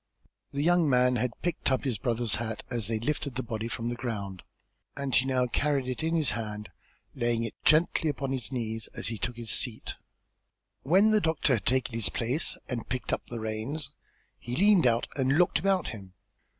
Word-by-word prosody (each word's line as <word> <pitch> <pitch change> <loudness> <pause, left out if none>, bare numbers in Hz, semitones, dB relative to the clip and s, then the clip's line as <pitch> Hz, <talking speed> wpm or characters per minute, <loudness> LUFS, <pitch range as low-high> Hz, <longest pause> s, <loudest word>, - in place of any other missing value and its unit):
The 140 +1 -2
young 175 -2 +4
man 125 -1 +4
had 120 0 -2
picked 175 -4 0
up 130 - +1
his 125 -8 -1
brother's 115 -1 0
hat, 110 -1 -4
as 120 -4 0
they 115 0 +1
lifted 140 +2 -2
the 130 - -1
body 110 -1 -3
from 115 0 -3
the 120 - -2
ground, 105 -6 -4 0.6
and 140 -2 -3
he 130 - +4
now 130 -1 +2
carried 140 +1 0
it 130 +3 -3
in 165 +1 0
his 155 -4 +2
hand, 105 -1 -4 0.4
laying 120 -3 +1
it 115 - -3
gently 160 0 +4
upon 135 -2 -2
his 130 -4 -2
knees 115 -3 -3
as - - -2
he 115 -2 -4
took 125 - -2
his 115 -3 -3
seat. 115 -4 0 0.9
When 190 +9 +5
the 215 -1 +4
doctor 160 -5 +2
had 110 -6 -1
taken 125 -1 +1
his 115 -2 +1
place 125 +7 0
and 120 -2 -4
picked 125 +1 -2
up - - 0
the 120 - -4
reins 110 +7 -4 0.5
he 120 +1 -4
leaned 195 -4 +5
out 115 0 +2
and 135 +1 +2
looked 180 0 +4
about 190 -3 +1
him. 95 -4 -9
125 Hz, 200 wpm, -29 LUFS, 115-145 Hz, 0.9 s, When